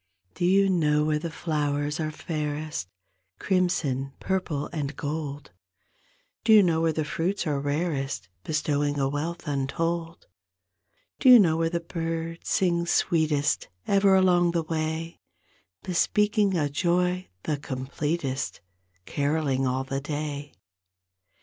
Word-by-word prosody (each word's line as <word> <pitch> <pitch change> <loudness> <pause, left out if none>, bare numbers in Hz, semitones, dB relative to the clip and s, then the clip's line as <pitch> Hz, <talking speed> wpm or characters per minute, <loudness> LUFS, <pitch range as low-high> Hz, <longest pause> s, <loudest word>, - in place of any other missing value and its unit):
Do 175 - -1
you 195 +2 +4
know 150 -5 +2
where 155 -1 +1
the 165 +2 -4
flowers 150 -2 -1
are 155 -1 -1
fairest 150 - -4 0.5
Crimson, 155 - 0
purple 175 -7 -1
and 150 -3 -3
gold; 145 -2 -5 0.9
Do 220 - +3
you 210 -2 +8
know 165 -3 +2
where 165 0 +3
the 155 -1 -2
fruits 175 +7 -1
are 145 -3 0
rarest 145 - -2 0.2
Bestowing 145 -1 0
a 135 -1 +1
wealth 160 +5 -4
untold; 165 +4 -2 0.9
Do 265 - +5
you 250 - +11
know 170 -8 +4
where 165 0 +1
the 170 0 -1
birds 165 0 -4
sing 170 -2 +1
sweetest 155 -4 +1 0.2
Ever 195 -1 +4
along 175 -2 +4
the 170 -1 +1
way, 160 +1 -3 0.6
Bespeaking 205 +2 +2
a 150 -3 +1
joy 180 +4 0
the 150 - -1
completest 140 +1 -3 0.5
Caroling 140 -2 0
all 130 +1 0
the 135 +1 -3
day? 145 -1 -4
160 Hz, 125 wpm, -26 LUFS, 145-175 Hz, 0.9 s, you